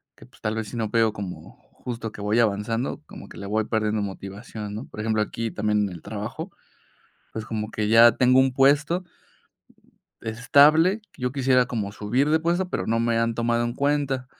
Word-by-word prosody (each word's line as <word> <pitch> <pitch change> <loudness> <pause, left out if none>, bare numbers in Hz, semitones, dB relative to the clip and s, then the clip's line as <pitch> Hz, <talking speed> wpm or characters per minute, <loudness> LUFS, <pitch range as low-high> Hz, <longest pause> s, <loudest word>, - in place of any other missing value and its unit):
que, - - -16
pues, - - -23
tal 110 0 -1
vez, 110 -1 -3
si 120 - -7
no 110 -2 -1
veo 115 -1 +3
como 100 -4 -8 0.2
justo 115 -3 -6
que - - -10
voy 105 +3 +1
avanzando 115 +2 0
como - - -11
que - - -12
le 100 - -6
voy 110 +1 0
perdiendo 110 -1 0
motivación, 100 +2 -7
¿no? 110 +5 -6
Por - - -12
ejemplo, 110 -1 +1
aquí 115 +1 -4
también 105 -1 0
en - - -6
el 85 -3 -10
trabajo, - - -6 0.8
pues, 110 - -5
como 110 -1 -4
que 105 -1 -1
ya 115 +1 +7
tengo 130 0 +4
un 130 0 +4
puesto 145 +7 +3 1.2
estable, 145 - +4
que - - -15
yo 125 - 0
quisiera 130 -2 +2
como 105 -5 -3
subir 120 +8 0
de 160 +1 +3
puesto, 175 +3 0
pero - - -3
no 115 +1 +1
me 115 0 +1
han 115 0 +1
tomado 120 0 0
en 120 - -2
cuenta. 140 -2 0
115 Hz, 200 wpm, -24 LUFS, 105-130 Hz, 1.2 s, ya